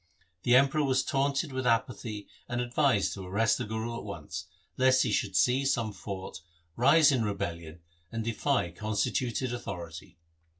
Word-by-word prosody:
The 120 Hz, +4 st, +4 dB
Emperor 140 Hz, +3 st, +4 dB
was 130 Hz, -2 st, +2 dB
taunted 140 Hz, +2 st, 0 dB
with 130 Hz, -1 st, -1 dB
apathy 115 Hz, -3 st, -1 dB, 0.2 s
and 120 Hz, 0 st, -2 dB
advised 125 Hz, -3 st, +2 dB
to 95 Hz, -, -7 dB
arrest 100 Hz, +5 st, +1 dB
the -, -, -2 dB
Guru 110 Hz, +2 st, -4 dB
at -, -, -9 dB
once, 85 Hz, -3 st, -7 dB, 0.3 s
lest 130 Hz, 0 st, +4 dB
he 120 Hz, -, 0 dB
should 100 Hz, -3 st, 0 dB
seize 135 Hz, +5 st, +3 dB
some 115 Hz, -4 st, -1 dB
fort, 95 Hz, -2 st, -7 dB, 0.3 s
rise 145 Hz, +5 st, +6 dB
in 125 Hz, -4 st, +1 dB
rebellion 85 Hz, -5 st, -4 dB, 0.3 s
and 115 Hz, 0 st, -3 dB
defy 115 Hz, -4 st, 0 dB
constituted 115 Hz, +6 st, -1 dB
authority. 90 Hz, -5 st, -7 dB
115 Hz, 155 wpm, -29 LUFS, 100-130 Hz, 0.3 s, rise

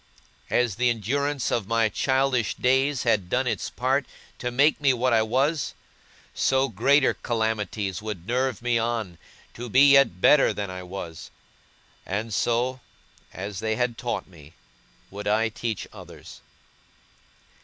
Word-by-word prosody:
As 120 Hz, -5 st, +1 dB
the 125 Hz, 0 st, +2 dB
endurance 135 Hz, +5 st, -1 dB
of 100 Hz, -5 st, -1 dB
my 115 Hz, 0 st, +2 dB
childish 130 Hz, 0 st, 0 dB
days 130 Hz, +2 st, +1 dB
had 105 Hz, -7 st, +1 dB
done 130 Hz, +5 st, +1 dB
its 125 Hz, -, -2 dB
part 130 Hz, +3 st, 0 dB, 0.3 s
to 125 Hz, -, -2 dB
make 140 Hz, +5 st, +2 dB
me 135 Hz, -2 st, +4 dB
what 125 Hz, 0 st, +1 dB
I 110 Hz, -, +4 dB
was, 135 Hz, +8 st, 0 dB, 0.6 s
so 135 Hz, 0 st, +1 dB
greater 130 Hz, +7 st, +3 dB
calamities 105 Hz, -5 st, -2 dB
would 105 Hz, -6 st, -6 dB
nerve 125 Hz, +1 st, -1 dB
me 120 Hz, -1 st, +2 dB
on, 115 Hz, -7 st, -3 dB, 0.3 s
to 120 Hz, +1 st, -7 dB
be 135 Hz, +5 st, +6 dB
yet 140 Hz, -10 st, +5 dB
better 150 Hz, +9 st, +5 dB
than 100 Hz, -2 st, -4 dB
I 90 Hz, 0 st, -6 dB
was; 90 Hz, -3 st, -8 dB, 0.7 s
and 105 Hz, +4 st, -4 dB
so, 120 Hz, +4 st, 0 dB, 0.5 s
as 100 Hz, 0 st, -6 dB
they 110 Hz, 0 st, -1 dB
had 125 Hz, 0 st, -1 dB
taught 120 Hz, 0 st, -3 dB
me, 80 Hz, -4 st, -16 dB, 0.6 s
would 100 Hz, +1 st, -6 dB
I 110 Hz, +2 st, +2 dB
teach 110 Hz, -2 st, -4 dB
others. -, -, -12 dB
115 Hz, 145 wpm, -25 LUFS, 105-130 Hz, 0.7 s, be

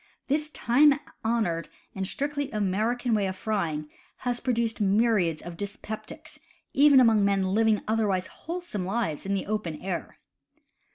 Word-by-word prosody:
This 300 Hz, +2 st, +1 dB
time 285 Hz, +2 st, +4 dB, 0.2 s
honored 215 Hz, -8 st, 0 dB, 0.2 s
and 190 Hz, -1 st, -3 dB
strictly 285 Hz, +4 st, -2 dB
American 220 Hz, +4 st, 0 dB
way 205 Hz, -3 st, +2 dB
of 190 Hz, -, -3 dB
frying 170 Hz, -8 st, -2 dB, 0.4 s
has 245 Hz, -1 st, 0 dB
pro 255 Hz, -, 0 dB
duced 230 Hz, -2 st, 0 dB
myriads 200 Hz, -5 st, +2 dB
of 175 Hz, 0 st, -7 dB
dyspeptics, 205 Hz, +2 st, -7 dB, 0.3 s
even 285 Hz, -1 st, +7 dB
among 225 Hz, -4 st, +5 dB
men 195 Hz, -1 st, +1 dB
living 220 Hz, -1 st, +3 dB
otherwise 210 Hz, -4 st, +1 dB
wholesome 335 Hz, -, -5 dB
lives 190 Hz, -4 st, -2 dB
in 200 Hz, -, +1 dB
the 195 Hz, -, -2 dB
open 195 Hz, -7 st, -3 dB
air! 185 Hz, -2 st, -5 dB
215 Hz, 145 wpm, -27 LUFS, 190-240 Hz, 0.4 s, even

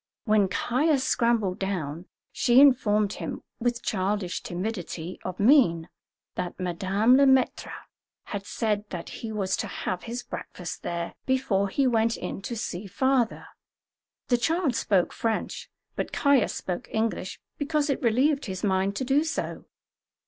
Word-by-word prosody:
When 210 Hz, -3 st, +4 dB
Caius 265 Hz, -, +1 dB
scrambled 230 Hz, -8 st, +1 dB
down, 175 Hz, -4 st, -3 dB, 0.2 s
she 245 Hz, -1 st, +4 dB
informed 215 Hz, -7 st, +4 dB
him, -, -, -6 dB, 0.2 s
with 240 Hz, 0 st, -1 dB
childish 190 Hz, -2 st, -1 dB
timidity 180 Hz, -2 st, -5 dB
of 185 Hz, -1 st, -5 dB
mien, 200 Hz, -, +4 dB, 0.4 s
that 180 Hz, 0 st, -4 dB
Madame 195 Hz, +7 st, +2 dB
Le 280 Hz, -, +6 dB
Maître 265 Hz, -1 st, +2 dB, 0.5 s
had 205 Hz, -1 st, -5 dB
said 210 Hz, -2 st, -1 dB
that 175 Hz, -2 st, -6 dB
he 225 Hz, -, -4 dB
was 200 Hz, -3 st, 0 dB
to -, -, -2 dB
have 180 Hz, -1 st, -3 dB
his 240 Hz, +1 st, -5 dB
breakfast 180 Hz, -1 st, -7 dB
there 170 Hz, 0 st, -3 dB
before 245 Hz, -7 st, +1 dB
he 275 Hz, +7 st, +1 dB
went 230 Hz, -2 st, +2 dB
in -, -, -5 dB
to 235 Hz, -, -4 dB
see 200 Hz, -2 st, -4 dB
"father." 255 Hz, +4 st, +1 dB, 0.8 s
The 245 Hz, -1 st, +3 dB
child 320 Hz, -1 st, +1 dB
spoke 200 Hz, -5 st, +1 dB
French, 225 Hz, -1 st, -2 dB, 0.3 s
but -, -, -3 dB
Caius 280 Hz, -4 st, +3 dB
spoke 180 Hz, -2 st, -4 dB
English 220 Hz, -4 st, -2 dB, 0.2 s
because 300 Hz, 0 st, 0 dB
it 275 Hz, -, -1 dB
relieved 270 Hz, +5 st, +2 dB
his 185 Hz, -2 st, -5 dB
mind 195 Hz, 0 st, +1 dB
to 260 Hz, -, -2 dB
do 275 Hz, +4 st, +3 dB
so. 320 Hz, -, -4 dB
215 Hz, 145 wpm, -26 LUFS, 190-255 Hz, 0.8 s, Le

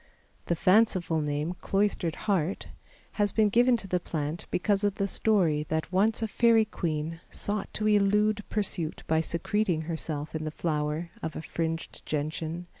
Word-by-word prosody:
The 170 Hz, -, +1 dB
fanciful 185 Hz, -3 st, +3 dB
name, 150 Hz, +3 st, -1 dB
Cloistered 195 Hz, -5 st, 0 dB
Heart, 190 Hz, -3 st, 0 dB, 0.5 s
has 205 Hz, -1 st, +3 dB
been 215 Hz, -2 st, +3 dB
given 240 Hz, +3 st, +4 dB
to 200 Hz, -, -7 dB
the 180 Hz, -1 st, +1 dB
plant 155 Hz, -1 st, -4 dB
because 200 Hz, +2 st, +1 dB
of 205 Hz, -1 st, +1 dB
the 200 Hz, -, 0 dB
story 175 Hz, -8 st, +2 dB
that 160 Hz, +2 st, -1 dB
once 215 Hz, +4 st, +2 dB
a -, -, +1 dB
fairy 225 Hz, +1 st, +4 dB
queen 165 Hz, -5 st, -3 dB
sought 205 Hz, -1 st, -3 dB
to 215 Hz, -, 0 dB
elude 210 Hz, 0 st, +3 dB
pursuit 185 Hz, -6 st, -1 dB
by 160 Hz, 0 st, +2 dB
secreting 170 Hz, +1 st, 0 dB
herself 160 Hz, -2 st, -4 dB
in 160 Hz, -1 st, -3 dB
the 155 Hz, -, -2 dB
flower 155 Hz, +1 st, -2 dB
of 160 Hz, -, -4 dB
a -, -, -4 dB
fringed 165 Hz, 0 st, -4 dB
Gentian. 155 Hz, +3 st, -3 dB
175 Hz, 160 wpm, -28 LUFS, 160-205 Hz, 0.5 s, given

